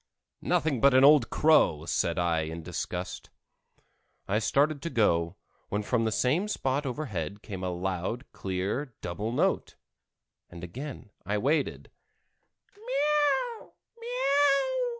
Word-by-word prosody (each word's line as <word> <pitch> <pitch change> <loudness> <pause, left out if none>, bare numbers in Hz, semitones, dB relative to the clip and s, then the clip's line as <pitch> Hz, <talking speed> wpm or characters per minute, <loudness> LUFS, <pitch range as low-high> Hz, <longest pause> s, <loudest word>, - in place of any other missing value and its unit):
"Nothing 140 -7 0
but 140 -1 +5
an 130 - +6
old 140 -4 +6
crow," 115 - +3
said 85 0 0
I 85 -2 +1
in 80 +1 -5
disgust. - - -5 1.0
I 105 +2 +1
started 145 +5 +1
to 170 - -3
go, 85 - +1 0.3
when 105 +1 -1
from 115 +1 0
the 110 - 0
same 140 - +1
spot 140 -7 -1
overhead 105 - -4
came 95 -4 -6
a 90 - -1
loud, 95 +7 -3
clear 100 +8 -3
double 100 +6 -3
note, 120 - 0 0.7
and 85 -1 -11
again 125 - -8
I 105 +1 -1
waited. 140 +6 -1
110 Hz, 115 wpm, -28 LUFS, 90-140 Hz, 1.0 s, an